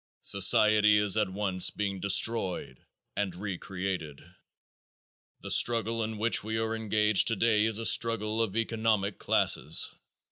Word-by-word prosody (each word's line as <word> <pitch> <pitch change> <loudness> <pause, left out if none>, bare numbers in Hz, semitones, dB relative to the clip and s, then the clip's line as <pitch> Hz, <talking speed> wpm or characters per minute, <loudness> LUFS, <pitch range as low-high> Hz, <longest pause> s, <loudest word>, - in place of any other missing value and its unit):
Society 105 +2 +3
is 105 -1 +2
at 105 -3 0
once 95 -2 0
being 100 -2 -5
destroyed 95 - 0 0.4
and 100 -3 -3
re 100 +1 -6
created. 90 -6 -6 1.2
The - - -6
struggle 115 -1 +2
in 110 0 -6
which 110 0 0
we 110 +1 -4
are 110 0 -3
engaged 105 -2 +1
today 115 -1 +1
is 110 -1 -1
a 115 - -5
struggle 115 -1 +1
of 110 -3 -3
economic 110 -3 -2
classes. - - +1
105 Hz, 135 wpm, -27 LUFS, 100-110 Hz, 1.2 s, Society